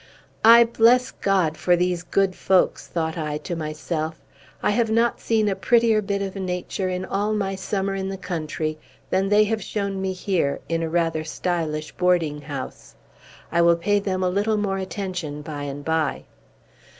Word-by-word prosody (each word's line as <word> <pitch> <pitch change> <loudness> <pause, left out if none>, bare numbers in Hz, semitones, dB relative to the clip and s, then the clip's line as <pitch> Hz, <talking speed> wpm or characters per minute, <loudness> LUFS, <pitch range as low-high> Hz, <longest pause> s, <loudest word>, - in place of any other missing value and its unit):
"I 230 +1 +9
bless 235 +2 +4
God 185 -6 +1
for 180 - +3
these 180 0 0
good 190 +1 +1
folks!" 190 -1 +2
thought 160 -1 -2
I 150 -1 -2
to 175 - -3
myself. 155 0 -4 0.4
"I - - +3
have 225 +1 +1
not 230 +2 +1
seen 220 -2 +1
a 195 - +1
prettier 230 +2 +3
bit 200 -1 -2
of 195 0 -5
nature, 185 0 -3
in 185 0 -3
all 205 +3 -1
my 195 -2 -1
summer 195 0 -2
in 190 0 -3
the 195 - -4
country, 155 -3 -3 0.3
than 190 +1 +1
they 210 +1 +5
have 215 +1 -1
shown 200 -1 -3
me 190 0 -1
here, 185 -6 -1
in 165 0 -1
a 165 - -2
rather 165 -1 0
stylish 155 -2 -2
boarding 170 -5 +1
house. 135 - -7 0.6
I 170 - +3
will 170 0 +5
pay 205 +4 +1
them 190 -2 -2
a 180 - +2
little 205 +3 +1
more 195 -2 -1
attention 185 -6 -4
by 145 -2 -5
and 145 +1 -6
by." 160 -2 0
185 Hz, 175 wpm, -23 LUFS, 160-200 Hz, 0.6 s, I